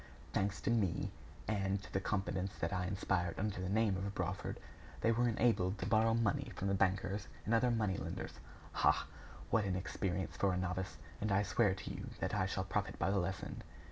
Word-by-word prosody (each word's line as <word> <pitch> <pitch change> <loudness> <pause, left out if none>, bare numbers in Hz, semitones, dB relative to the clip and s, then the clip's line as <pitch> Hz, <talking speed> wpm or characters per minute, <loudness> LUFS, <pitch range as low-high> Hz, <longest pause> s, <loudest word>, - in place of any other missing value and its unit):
Thanks 100 +1 +1
to - - +1
me, 105 -7 +1 0.4
and 100 -2 +1
to - - -12
the 95 - +2
confidence 95 -1 -1
that - - -1
I 90 -1 0
inspired 90 -2 0
under 100 -2 -1
the 90 - -2
name 105 -1 +3
of 100 +1 -3
Brawford, - - -2 0.4
they 115 - +4
were 120 +1 +3
enabled 110 -4 +2
to 90 - -3
borrow 110 +2 +4
money 110 -5 +1
from 100 - -1
the - - +2
bankers 95 +1 +1 0.2
and 110 - +1
other 115 +2 +4
money 105 -5 +1
lenders. - - -5 0.3
Ha! - - +3 0.5
what 110 - +4
an 95 -2 0
experience 95 0 -2
for 100 -2 +2
a - - 0
novice! 90 -2 -2 0.2
And 105 0 0
I 100 +1 +4
swear 105 -2 +3
to 95 - -6
you - - -6
that - - -1
I 95 - +2
shall 95 -1 -1
profit 95 +1 -1
by 95 - +1
the 100 - +3
lesson!" 95 +1 -3
100 Hz, 205 wpm, -36 LUFS, 95-105 Hz, 0.5 s, they